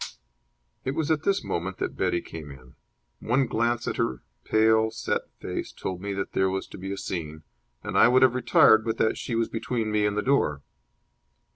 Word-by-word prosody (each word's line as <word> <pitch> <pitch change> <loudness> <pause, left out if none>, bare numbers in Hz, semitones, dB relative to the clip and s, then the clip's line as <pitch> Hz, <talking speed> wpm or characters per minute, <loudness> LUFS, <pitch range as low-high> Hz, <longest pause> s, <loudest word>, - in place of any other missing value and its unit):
It 130 +2 -2
was 160 -1 0
at 155 -2 +2
this 200 0 +1
moment 90 +2 -3
that - - -3
Betty 85 - 0
came 80 -3 -9
in. 65 -2 -13 0.5
One 130 +4 +1
glance 120 0 0
at - - -2
her 65 -1 -1 0.2
pale, 110 0 +3
set 110 - -3
face - - -5
told 90 -1 -5
me 100 +1 -4
that 95 - -3
there 95 0 +2
was 95 0 -2
to - - -10
be 95 +1 -5
a 100 - -4
scene, 80 -5 -5 0.4
and - - -5
I - - +7
would 130 +2 +5
have 130 -2 +5
retired, 110 -3 +5
but 115 0 -2
that 110 - +2
she 120 - -3
was 115 0 +1
between 115 -1 -2
me 105 -1 +2
and 105 0 -2
the 105 - 0
door. 75 - +1
110 Hz, 205 wpm, -26 LUFS, 95-120 Hz, 0.5 s, I